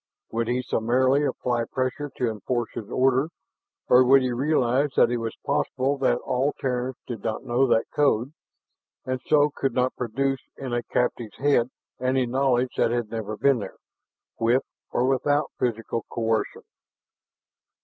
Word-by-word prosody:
Would 115 0 -1
he 125 +1 0
summarily 130 +5 +2
apply 120 -4 -1
pressure 130 +4 -2
to 125 - +1
enforce 115 +2 -2
his 110 -3 -7
order, 130 +4 +2 0.6
or 125 +1 +7
would 135 +1 +5
he 130 - 0
realize 135 +1 +1
that 120 - +4
it 120 - 0
was 115 -1 -4
possible 135 +2 0
that 135 - +2
all 130 +3 0
Terrans 125 0 -2
did 115 -5 -6
not 110 -1 -2
know 130 +2 +2
that 115 -2 +3
code, 135 -2 +2 0.7
and 130 -1 -2
so 150 -1 +5
he 150 - +2
could 135 -3 0
not 130 0 +1
produce 135 +3 -1 0.2
in 130 -3 -5
a 120 - +1
captive's 120 -2 -2
head 135 -4 +2 0.3
any 130 0 +1
knowledge 130 0 +1
that - - +3
had 120 -2 -2
never 110 -2 -4
been 140 0 +3
there 100 - -7 0.6
with 120 +3 +3 0.3
or 125 - +1
without 145 +3 +1
physical 115 -1 -1
coercion? 115 -1 -1
125 Hz, 160 wpm, -25 LUFS, 120-135 Hz, 0.7 s, or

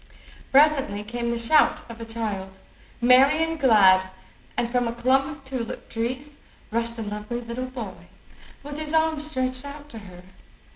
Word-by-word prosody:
Presently 275 -8 +4
came 235 +2 -3
the 235 - -1
shout 235 +7 +3
of 230 0 -10
a - - -5
child, 205 -4 -4 0.4
merry 270 +6 +5
and 325 0 -3
glad, 190 -8 +5 0.5
and 240 - +1
from 245 0 0
a 230 - -2
clump 260 +3 +2
of 285 -1 -9
tulip 260 -4 -5
trees 255 +6 -4 0.3
rushed 230 +1 -1
a 225 - -3
lovely 210 +3 -5
little 240 +2 -5
boy, 235 -7 -8 0.6
with 290 +1 -7
his 310 0 -2
arms 315 -1 +1
stretched 255 -3 -2
out 290 +1 -9
to 230 - -9
her. 180 -3 -13
245 Hz, 160 wpm, -24 LUFS, 225-280 Hz, 0.6 s, merry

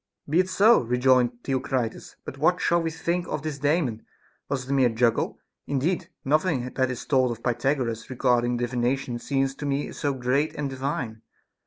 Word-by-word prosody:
10. - - -11
Be 165 - +4
it 185 0 +2
so, 215 +5 +5
rejoined 125 0 +2
Theocritus, 130 -3 -2
but 135 - -7
what 175 +4 +3
shall 170 -1 +2
we 165 - -1
think 170 +2 -2
of 150 -1 -3
his 150 -3 -4
Daemon'? 145 -6 0 0.5
Was 135 -2 -1
it 135 - -6
a - - +2
mere 130 -3 +4
juggle'? 115 0 +1 0.3
Indeed, 170 +6 -1 0.2
nothing 140 -3 +1
that 130 -1 +1
is 125 - -5
told 130 -3 +3
of 115 -1 -6
Pythagoras 120 -2 -1
regarding 125 -1 +1
divination 120 +1 -1
seems 135 +1 0
to 145 +1 -5
me 140 +1 -1
so 140 -2 -2
great 130 +4 0
and 145 -2 -3
divine. 130 -4 -3
135 Hz, 180 wpm, -25 LUFS, 125-150 Hz, 0.5 s, so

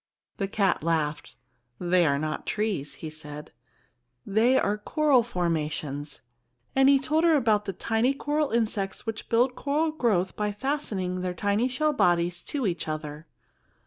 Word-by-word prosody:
The 195 - -1
cat 195 -2 +1
laughed. 155 -2 -1 0.4
"They 175 -1 +3
are 140 0 +2
not 155 +1 -3
trees," 195 -11 -2
he 155 - -5
said; 150 -1 -9 0.7
"they 225 +6 +3
are 210 -3 +1
coral 290 +3 +3
formations;" 155 - -3 0.5
and 270 0 +6
he 280 - +7
told 310 +4 0
her 335 -2 +5
about 220 -6 +2
the 195 - -3
tiny 230 +7 +1
coral 295 +1 0
insects 215 -4 -1
which 225 -1 -5
build 245 +2 +3
coral 300 +4 0
growth 215 - 0
by 210 -1 -1
fastening 205 -8 -2
their 180 -1 -3
tiny 205 +6 +1
shell 300 +4 0
bodies 175 -7 +2
to 280 -5 -2
each 175 -5 -2
other. 155 0 -5
205 Hz, 150 wpm, -27 LUFS, 170-255 Hz, 0.7 s, he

